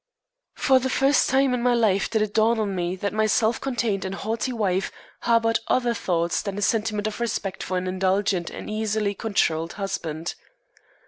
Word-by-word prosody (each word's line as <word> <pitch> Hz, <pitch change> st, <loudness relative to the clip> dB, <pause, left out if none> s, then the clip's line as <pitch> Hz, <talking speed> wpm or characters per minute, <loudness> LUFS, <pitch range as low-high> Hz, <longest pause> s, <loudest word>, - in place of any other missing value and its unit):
For 265 Hz, -2 st, +4 dB
the 260 Hz, +1 st, -2 dB
first 270 Hz, +1 st, +3 dB
time 270 Hz, 0 st, +3 dB
in 250 Hz, -, 0 dB
my 245 Hz, 0 st, +3 dB
life 210 Hz, -4 st, +2 dB
did 220 Hz, -2 st, +1 dB
it 210 Hz, -1 st, -4 dB
dawn 225 Hz, +1 st, +3 dB
on 205 Hz, -2 st, -1 dB
me 175 Hz, 0 st, -2 dB
that 200 Hz, +2 st, -3 dB
my 215 Hz, 0 st, +2 dB
self 220 Hz, +1 st, +2 dB
contained 235 Hz, -7 st, -1 dB
and 190 Hz, 0 st, -4 dB
haughty 225 Hz, +5 st, -2 dB
wife 195 Hz, -5 st, 0 dB, 0.3 s
harbored 230 Hz, -1 st, +2 dB
other 245 Hz, -2 st, +2 dB
thoughts 170 Hz, -6 st, 0 dB
than 200 Hz, -1 st, -5 dB
a -, -, -3 dB
sentiment 215 Hz, -1 st, 0 dB
of 215 Hz, +1 st, -3 dB
respect 205 Hz, -5 st, -2 dB
for 185 Hz, -, -2 dB
an 180 Hz, -, -2 dB
indulgent 185 Hz, -1 st, 0 dB
and -, -, -8 dB
easily 215 Hz, -1 st, -1 dB
controlled 170 Hz, -6 st, 0 dB
husband. 170 Hz, -5 st, -4 dB
215 Hz, 185 wpm, -24 LUFS, 190-230 Hz, 0.3 s, For